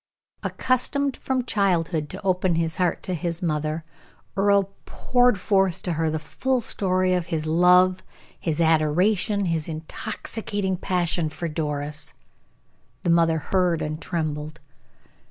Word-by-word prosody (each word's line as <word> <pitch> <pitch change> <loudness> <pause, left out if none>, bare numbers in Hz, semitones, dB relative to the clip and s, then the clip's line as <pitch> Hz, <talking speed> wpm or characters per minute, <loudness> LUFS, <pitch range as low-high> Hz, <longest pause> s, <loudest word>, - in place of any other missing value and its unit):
Accustomed 270 +2 0
from 260 -2 -2
childhood 175 -8 0
to 190 - -7
open 185 -2 +1
his 165 0 -1
heart 180 -3 0
to 185 - -2
his 170 +2 -3
mother, 155 0 -1 0.5
Earle 200 0 +2
poured 245 -5 +2
forth 190 -2 +1
to 180 - -2
her 160 0 0
the 155 - -1
full 255 +12 -1
story 185 -4 +1
of 180 -2 -1
his 160 -2 -2
love, 180 +3 +4 0.4
his 160 -2 -2
adoration, 180 +6 +2
his 165 -2 -1
intoxicating 190 +5 -3
passion 175 -3 0
for 170 +2 -4
Doris. 150 -1 -2 0.9
The 170 - +2
mother 165 -1 +4
heard 175 0 +1
and 155 +1 -4
trembled. 155 -2 -3
175 Hz, 130 wpm, -24 LUFS, 160-195 Hz, 0.9 s, love